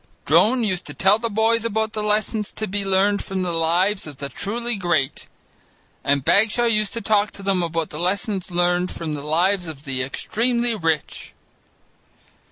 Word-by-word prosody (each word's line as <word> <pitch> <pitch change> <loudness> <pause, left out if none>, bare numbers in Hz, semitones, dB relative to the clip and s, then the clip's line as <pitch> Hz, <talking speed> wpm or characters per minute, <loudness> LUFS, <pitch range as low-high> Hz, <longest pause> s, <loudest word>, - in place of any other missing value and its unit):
Drone 240 +2 +4
used 185 -4 -1
to - - -8
tell 195 +3 +4
the 230 0 -1
boys 225 +2 +2
about 220 -1 -1
the 215 - -2
lessons 210 0 0
to 215 - -3
be 200 0 -2
learned 195 +1 +2
from 190 -1 -3
the 180 - -2
lives 170 +4 +1
of 145 -3 -9
the 140 0 -5
truly 235 +7 -3
great, 175 -8 -1 0.8
and 140 -1 +1
Bagshaw 220 +3 +3
used 215 -3 +1
to 230 - -4
talk 210 -1 +2
to 200 - -11
them 195 -2 +1
about 165 -1 -2
the 150 - -7
lessons 190 +2 -1
learned 175 +1 +1
from 160 -2 -5
the 145 - -4
lives 175 +5 +1
of 150 -3 -8
the 135 -2 -2
extremely 235 - 0
rich. 165 -7 -2
195 Hz, 175 wpm, -22 LUFS, 170-215 Hz, 0.8 s, Drone